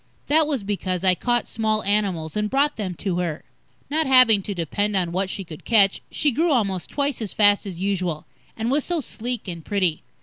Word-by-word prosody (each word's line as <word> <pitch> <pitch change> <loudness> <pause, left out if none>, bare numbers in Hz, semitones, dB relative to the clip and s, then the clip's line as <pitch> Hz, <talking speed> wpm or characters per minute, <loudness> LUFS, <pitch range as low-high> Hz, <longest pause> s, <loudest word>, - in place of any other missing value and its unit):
That 310 +1 +3
was 275 -8 -2
because 190 -3 -3
I 185 -1 +5
caught 240 +6 0
small 215 -1 -1
animals 190 -6 -1
and 210 0 -1
brought 285 +4 +2
them 190 -5 -4
to 180 -1 -2
her. 165 -3 -3 0.4
Not 310 +1 0
having 255 -6 +6
to 200 +1 -5
depend 200 +5 -1
on 180 -3 0
what 190 +2 -1
she 195 - -4
could 160 -4 -11
catch, 200 -4 +3
she 295 - +1
grew 320 +7 +1
almost 200 -9 0
twice 280 -3 -1
as 215 - -3
fast 205 0 +4
as 180 -3 -7
usual, 185 -5 -2 0.3
and 225 +2 -1
was 285 +1 +1
so 345 -2 -1
sleek 240 -4 -5
and 170 -3 -6
pretty. 185 -6 0
205 Hz, 205 wpm, -23 LUFS, 185-245 Hz, 0.4 s, having